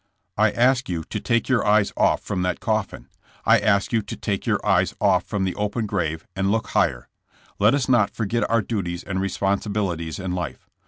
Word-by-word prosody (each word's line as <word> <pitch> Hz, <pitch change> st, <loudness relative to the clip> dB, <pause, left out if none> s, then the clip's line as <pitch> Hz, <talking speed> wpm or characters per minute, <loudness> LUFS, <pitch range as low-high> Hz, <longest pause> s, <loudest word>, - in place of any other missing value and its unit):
I -, -, +4 dB
ask 125 Hz, 0 st, +2 dB
you 85 Hz, -2 st, -2 dB
to -, -, -5 dB
take 115 Hz, 0 st, 0 dB
your 125 Hz, -3 st, +2 dB
eyes 105 Hz, -1 st, +3 dB
off -, -, +2 dB
from 95 Hz, -3 st, -2 dB
that 90 Hz, 0 st, -1 dB
coffin; 110 Hz, -4 st, -2 dB, 0.4 s
I -, -, +6 dB
ask 100 Hz, +2 st, +1 dB
you 115 Hz, -, +3 dB
to 100 Hz, -, -7 dB
take 100 Hz, -3 st, -3 dB
your -, -, +2 dB
eyes -, -, +2 dB
off 95 Hz, -3 st, +3 dB
from 100 Hz, -3 st, -2 dB
the 95 Hz, -1 st, -1 dB
open 105 Hz, +2 st, -2 dB
grave 80 Hz, -6 st, -2 dB
and 95 Hz, 0 st, 0 dB
look 110 Hz, 0 st, -1 dB
higher. -, -, 0 dB, 0.5 s
Let 105 Hz, +6 st, +5 dB
us 140 Hz, -3 st, -1 dB
not 120 Hz, -6 st, +4 dB
forget 115 Hz, 0 st, -2 dB
our 115 Hz, -1 st, +2 dB
duties 90 Hz, -5 st, -3 dB
and 95 Hz, -1 st, -3 dB
responsibilities 95 Hz, -4 st, -1 dB
in 95 Hz, -1 st, -4 dB
life. 90 Hz, -5 st, -5 dB
100 Hz, 200 wpm, -23 LUFS, 95-110 Hz, 0.5 s, I